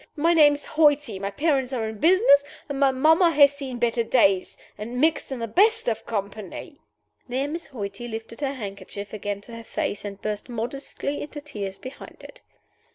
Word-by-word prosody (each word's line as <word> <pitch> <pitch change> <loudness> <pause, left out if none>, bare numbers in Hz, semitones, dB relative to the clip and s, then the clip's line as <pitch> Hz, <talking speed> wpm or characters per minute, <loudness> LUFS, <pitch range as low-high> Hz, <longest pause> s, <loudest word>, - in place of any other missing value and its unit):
My 330 +3 +3
name 300 -3 +7
is 290 - -6
Hoighty. 295 -8 +2
My 200 0 -2
parents 275 +2 0
are 225 -3 -1
in 220 -1 -7
business, 335 - +5 0.2
and 280 -1 -4
my 275 -1 +5
mamma 315 +7 +4
has 285 -3 +6
seen 270 -3 -6
better 235 0 +1
days, 195 -6 +2 0.2
and 235 +4 -5
mixed 310 -1 +1
in 265 - -3
the 230 -1 -3
best 430 - +3
of 225 -2 -2
company." 210 - -5 0.5
There 260 +3 -1
Miss 330 +1 -5
Hoighty 215 -3 -6
lifted 225 +2 -7
her 275 -1 -1
handkerchief 200 -2 -7
again 205 -1 -4
to 230 +2 -11
her 230 - -9
face, 205 -2 -3
and 200 -1 -7
burst 210 +3 -4
modestly 270 +4 -4
into 295 0 -7
tears 205 -10 -6
behind 260 +1 -11
it. - - -13
255 Hz, 185 wpm, -25 LUFS, 215-290 Hz, 0.5 s, name